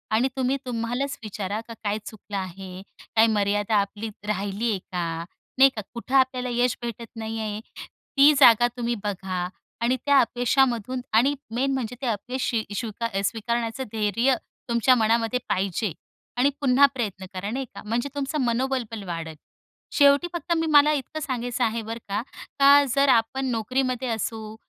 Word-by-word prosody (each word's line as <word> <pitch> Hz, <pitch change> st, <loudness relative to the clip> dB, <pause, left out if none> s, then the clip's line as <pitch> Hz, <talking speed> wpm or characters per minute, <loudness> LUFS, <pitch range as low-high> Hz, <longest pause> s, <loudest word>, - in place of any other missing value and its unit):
आणि 240 Hz, +4 st, +3 dB
तुम्ही 260 Hz, +1 st, +1 dB
तुम्हालाच 245 Hz, +3 st, -2 dB
विचारा, 205 Hz, -1 st, -4 dB
का 230 Hz, -, -7 dB
काय 205 Hz, 0 st, 0 dB
चुकलं 205 Hz, -2 st, -7 dB
आहे? 185 Hz, 0 st, -6 dB, 0.3 s
काय 225 Hz, +1 st, +6 dB
मर्यादा 205 Hz, 0 st, +1 dB
आपली 205 Hz, +2 st, -5 dB, 0.2 s
राहिली 205 Hz, +2 st, -1 dB
आहे 200 Hz, -, -1 dB
का? 170 Hz, -2 st, -4 dB, 0.3 s
नाही 270 Hz, +1 st, +8 dB
का 215 Hz, -, -3 dB
कुठं 245 Hz, +3 st, -4 dB
आपल्याला 260 Hz, -1 st, +2 dB
यश 245 Hz, 0 st, +1 dB
भेटत 235 Hz, -1 st, -5 dB
नाही 225 Hz, 0 st, -4 dB
आहे? 215 Hz, -1 st, -3 dB, 0.6 s
ती 285 Hz, +2 st, +8 dB
जागा 240 Hz, -3 st, +7 dB
तुम्ही 240 Hz, 0 st, -1 dB
बघा 185 Hz, -3 st, -3 dB, 0.3 s
आणि 240 Hz, +2 st, +2 dB
त्या 285 Hz, -1 st, +6 dB
अपयशामधून 245 Hz, 0 st, +1 dB
आणि 250 Hz, +6 st, +4 dB, 0.2 s
मेन 270 Hz, +3 st, +1 dB
म्हणजे 250 Hz, -2 st, -3 dB
ते -, -, -3 dB
अपयश 245 Hz, +4 st, -2 dB
शी 225 Hz, -2 st, 0 dB
स्वी 225 Hz, +1 st, -3 dB, 0.3 s
स्वीकारण्याचं 230 Hz, +4 st, -1 dB
धैर्य 225 Hz, +4 st, +2 dB, 0.3 s
तुमच्या 235 Hz, +2 st, +4 dB
मनामध्ये 230 Hz, +1 st, +2 dB
पाहिजे. 190 Hz, 0 st, -1 dB, 0.4 s
आणि 260 Hz, +3 st, +4 dB
पुन्हा 275 Hz, 0 st, +6 dB
प्रयत्न 205 Hz, -7 st, -4 dB
करा, 190 Hz, +2 st, -4 dB
नाही 265 Hz, +2 st, -2 dB
का. -, -, -7 dB
म्हणजे 235 Hz, +5 st, -1 dB
तुमचं 285 Hz, +1 st, -2 dB
मनोबल 255 Hz, +2 st, 0 dB
पण 220 Hz, -3 st, -6 dB
वाढंल. 165 Hz, -2 st, -4 dB, 0.6 s
शेवटी 285 Hz, +3 st, +5 dB
फक्त 345 Hz, 0 st, -5 dB
मी 325 Hz, 0 st, 0 dB
मला 300 Hz, -1 st, +6 dB
इतकं 295 Hz, +2 st, -3 dB
सांगायचं 250 Hz, -4 st, -2 dB
आहे 230 Hz, 0 st, 0 dB
बरं 225 Hz, +1 st, -5 dB
का, 205 Hz, +2 st, 0 dB, 0.4 s
का 280 Hz, +1 st, +8 dB
जर 275 Hz, 0 st, +4 dB
आपण 245 Hz, +2 st, +2 dB
नोकरीमध्ये 255 Hz, +2 st, -1 dB
असो 220 Hz, -1 st, -3 dB
235 Hz, 160 wpm, -25 LUFS, 210-260 Hz, 0.6 s, नाही